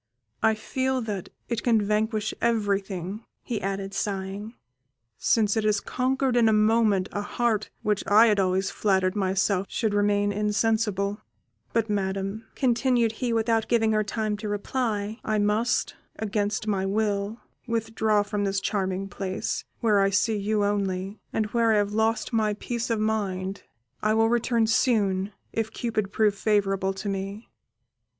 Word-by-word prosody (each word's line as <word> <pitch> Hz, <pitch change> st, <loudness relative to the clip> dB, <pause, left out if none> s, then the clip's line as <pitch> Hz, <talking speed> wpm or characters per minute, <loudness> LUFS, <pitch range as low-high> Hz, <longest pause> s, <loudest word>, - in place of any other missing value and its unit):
I 220 Hz, 0 st, +4 dB
feel 260 Hz, +4 st, -1 dB
that 205 Hz, -5 st, -4 dB, 0.2 s
it 235 Hz, -2 st, -2 dB
can 230 Hz, -3 st, +3 dB
vanquish 215 Hz, +1 st, 0 dB
everything," 200 Hz, -3 st, -1 dB, 0.2 s
he 230 Hz, -3 st, -3 dB
added, 195 Hz, 0 st, -3 dB
sighing, 200 Hz, +3 st, -3 dB, 0.6 s
"since 215 Hz, -3 st, +2 dB
it 220 Hz, -, +1 dB
has 210 Hz, -1 st, +2 dB
conquered 260 Hz, +2 st, 0 dB
in 235 Hz, -2 st, +5 dB
a -, -, +3 dB
moment 215 Hz, -3 st, +3 dB
a 205 Hz, -, -2 dB
heart 215 Hz, 0 st, 0 dB
which 210 Hz, -2 st, 0 dB
I 215 Hz, +3 st, +7 dB
had 210 Hz, -3 st, +3 dB
always 190 Hz, 0 st, +1 dB
flattered 190 Hz, -2 st, +1 dB
myself 195 Hz, 0 st, +1 dB
should 220 Hz, -3 st, -1 dB
remain 205 Hz, 0 st, +2 dB
insensible; 210 Hz, -1 st, 0 dB, 0.5 s
but, 230 Hz, -1 st, +1 dB
Madam," 195 Hz, +1 st, -2 dB
continued 245 Hz, -2 st, +2 dB
he, 240 Hz, +2 st, -2 dB
without 225 Hz, -1 st, +1 dB
giving 225 Hz, -2 st, +2 dB
her 215 Hz, 0 st, +2 dB
time 215 Hz, 0 st, -2 dB
to 210 Hz, 0 st, -5 dB
reply, 215 Hz, 0 st, -2 dB
"I 215 Hz, 0 st, 0 dB
must, 210 Hz, +3 st, +1 dB, 0.2 s
against 210 Hz, 0 st, -1 dB
my 200 Hz, -3 st, 0 dB
will, 205 Hz, +2 st, -1 dB, 0.3 s
withdraw 220 Hz, -2 st, +1 dB
from 205 Hz, 0 st, -2 dB
this 195 Hz, -1 st, 0 dB
charming 195 Hz, -1 st, -1 dB
place, 195 Hz, -1 st, -3 dB, 0.2 s
where 215 Hz, -3 st, +4 dB
I 195 Hz, 0 st, +4 dB
see 215 Hz, +3 st, +2 dB
you 205 Hz, 0 st, 0 dB
only, 195 Hz, 0 st, -1 dB
and 220 Hz, -, 0 dB
where 230 Hz, -2 st, +3 dB
I -, -, +4 dB
have 205 Hz, 0 st, 0 dB
lost 220 Hz, +2 st, 0 dB
my 215 Hz, -2 st, +2 dB
peace 235 Hz, +2 st, -3 dB
of 225 Hz, -2 st, +1 dB
mind; 200 Hz, -3 st, -1 dB, 0.4 s
I 215 Hz, +1 st, +2 dB
will 225 Hz, 0 st, +4 dB
return 235 Hz, -1 st, +2 dB
soon, 205 Hz, -4 st, +2 dB, 0.2 s
if 225 Hz, -1 st, -1 dB
Cupid 215 Hz, -4 st, -2 dB
prove 210 Hz, -1 st, +3 dB
favourable 195 Hz, -2 st, +1 dB
to 190 Hz, +2 st, -6 dB
me." 195 Hz, +2 st, -4 dB
210 Hz, 155 wpm, -26 LUFS, 200-225 Hz, 0.6 s, I